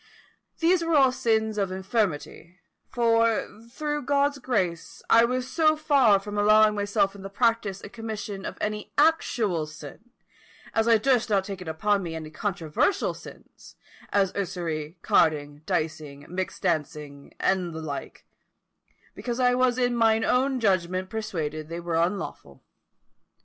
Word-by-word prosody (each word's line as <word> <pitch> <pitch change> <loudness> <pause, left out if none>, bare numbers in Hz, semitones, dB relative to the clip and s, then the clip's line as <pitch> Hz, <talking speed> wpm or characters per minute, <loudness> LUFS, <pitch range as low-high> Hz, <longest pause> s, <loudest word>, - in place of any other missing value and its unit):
These 345 +1 +3
were 330 -1 +1
all 270 -3 +5
sins 220 -4 0
of 195 -2 -1
infirmity; 185 -3 -3 0.3
for, 230 -2 +2 0.2
through 295 +3 -3
God's 285 +1 +1
grace, 190 -10 -2
I 230 +1 +7
was 255 +1 -2
so 310 +2 +2
far 275 -9 +4
from 205 +1 -5
allowing 215 +1 +5
myself 205 -1 0
in 200 - -12
the 195 - -7
practice 210 -2 0
and 200 - -11
commission 215 -4 -6
of - - -6
any 210 0 -3
actual 240 - +2
sin, 155 - -12 0.6
as 225 0 +1
I 230 -1 +6
durst 245 0 +1
not 200 -2 +2
take 195 -1 -7
upon 195 +5 0
me 165 -3 -5
any 155 -1 -7
controversial 175 - -1
sins, - - -14 0.4
as 195 -2 +2
usury, 170 -4 -4
carding, 145 -2 +2
dicing, 155 -5 -3
mixt 185 +1 -5
dancing, 150 -4 -3
and 185 -2 0
the 160 - -6
like, 145 -3 -7 0.9
because 240 0 -4
I 250 -1 +4
was 250 -1 +2
in 245 -1 +1
mine 225 -1 +3
own 260 +1 +1
judgment 185 -3 0
persuaded 160 -9 -4
they 170 +1 -5
were 170 -1 -4
unlawful. 170 +4 -2
205 Hz, 145 wpm, -26 LUFS, 170-240 Hz, 0.9 s, I